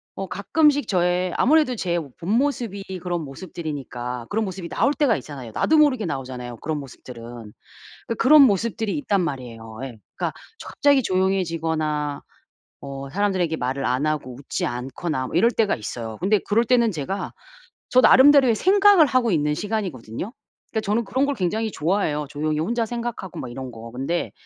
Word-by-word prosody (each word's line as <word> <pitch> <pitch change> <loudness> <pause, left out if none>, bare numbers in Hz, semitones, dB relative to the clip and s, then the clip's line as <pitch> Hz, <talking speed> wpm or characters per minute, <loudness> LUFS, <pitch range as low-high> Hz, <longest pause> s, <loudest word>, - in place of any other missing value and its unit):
어 195 0 -4
가끔씩 290 - +2
저의 180 -1 +1
아무래도 295 -2 +3
제 175 -5 -1
본 160 +4 -8
모습이 240 -8 -1 0.2
그런 175 -1 -2
모습들이니까 135 -6 -6
그런 220 +1 0
모습이 185 -2 -6
나올 280 - +1
때가 275 - +2
있잖아요. 135 -4 -8
나도 315 - +2
모르게 270 -9 +4
나오잖아요 125 -5 -5
그런 155 +6 -3
모습들은. 125 -3 -10 0.9
그니까 230 - -2
그런 295 +4 +7
모습들이 225 -2 +1
있단 205 -9 +1
말이에요. 120 -8 -5
예. 120 -4 -8 0.2
그니까 - - -2 0.3
조 - - -9
갑자기 285 -3 +3
조용해지거나 165 -6 -1 0.6
어 135 0 -7
사람들에게 185 -3 0
말을 130 -1 -2
안 125 +4 0
하고 145 -5 -2
웃지 140 - -3
않거나 130 +3 -3
뭐 - - -4
이럴 230 +6 +5
때가 220 -4 +1
있어요. 110 0 -6
근데 200 +3 +3
그럴 225 +3 +3
때는 235 -2 +3
제가 175 +5 -4 0.6
저 255 - +5
나름대로의 265 -2 +7
생각을 390 - +6
하고 255 -3 +2
있는 150 -4 +1
시간이거든요. 185 - -4 0.4
그러니까 220 - -1
저는 215 +3 0
그런 260 +6 0
걸 285 0 0
굉장히 215 +4 -1
좋아해요. 155 -4 0
조용히 150 +1 -2
혼자 230 +9 0
생각하고 235 -5 -5
막 125 - -5
이런 130 +1 -6
거. 115 0 -10
근데 135 +8 -2
180 Hz, 400 characters per minute, -23 LUFS, 140-230 Hz, 0.9 s, 그런